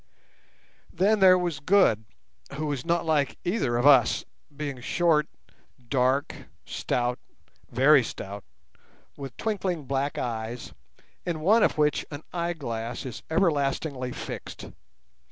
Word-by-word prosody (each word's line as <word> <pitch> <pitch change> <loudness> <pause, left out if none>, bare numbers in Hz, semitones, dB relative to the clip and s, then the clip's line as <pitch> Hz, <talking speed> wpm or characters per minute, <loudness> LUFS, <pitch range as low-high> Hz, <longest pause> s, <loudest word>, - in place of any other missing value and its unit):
Then 205 +5 +2
there 185 -1 +7
was 175 -4 -2
Good, 155 - +3 0.5
who 150 +1 -2
is 135 -3 -3
not 170 0 0
like 150 -4 +1
either 175 - 0
of 120 - 0
us, 135 -5 +5 0.3
being 140 -4 -4
short, 155 +1 +2 0.6
dark, 130 +2 +1 0.3
stout—very 125 +2 0
stout—with 100 - -11
twinkling 190 -7 -2
black 135 +2 -1
eyes, 115 0 -4 0.5
in 165 -3 -3
one 215 +8 +5
of - - +2
which 150 -1 +2
an 145 +1 -8
eyeglass 135 -10 -3
is 125 0 -6
everlastingly 145 -6 0
fixed. - - -7
145 Hz, 110 wpm, -26 LUFS, 125-170 Hz, 0.6 s, there